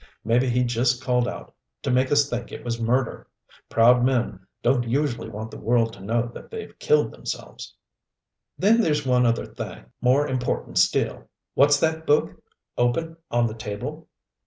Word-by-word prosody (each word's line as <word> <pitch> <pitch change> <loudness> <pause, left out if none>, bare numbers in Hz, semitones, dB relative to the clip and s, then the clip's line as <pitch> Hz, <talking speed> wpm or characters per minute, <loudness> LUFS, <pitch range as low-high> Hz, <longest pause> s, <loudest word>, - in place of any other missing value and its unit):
Maybe 125 +3 +2
he 125 +1 +2
just 120 +2 +1
called 125 -1 +1
out - - -7 0.3
to 135 - 0
make 130 +1 +2
us 145 -1 +4
think 120 -3 -4
it - - -8
was 115 -1 -3
murder. 125 +2 0 0.4
Proud 120 +2 +5
men 120 -7 0 0.2
don't 120 -1 +2
usually 125 -3 -1
want 110 +1 -7
the - - -9
world 115 0 +1
to - - -13
know 115 +3 0
that - - -11
they've 450 -1 -7
killed 455 0 +2
themselves. - - -7 0.8
"Then 225 +4 +4
there's 150 -7 +1
one 125 -1 +3
other 115 0 0
thing - - -8 0.2
more 130 +4 +3
important 130 -1 -1
still. - - +1 0.2
What's 145 +1 +5
that 160 0 0
book, 150 +1 +3 0.5
open, 160 +7 0
on 120 0 +2
the 110 - -2
table?" 105 -2 -6
125 Hz, 165 wpm, -24 LUFS, 115-140 Hz, 0.8 s, Proud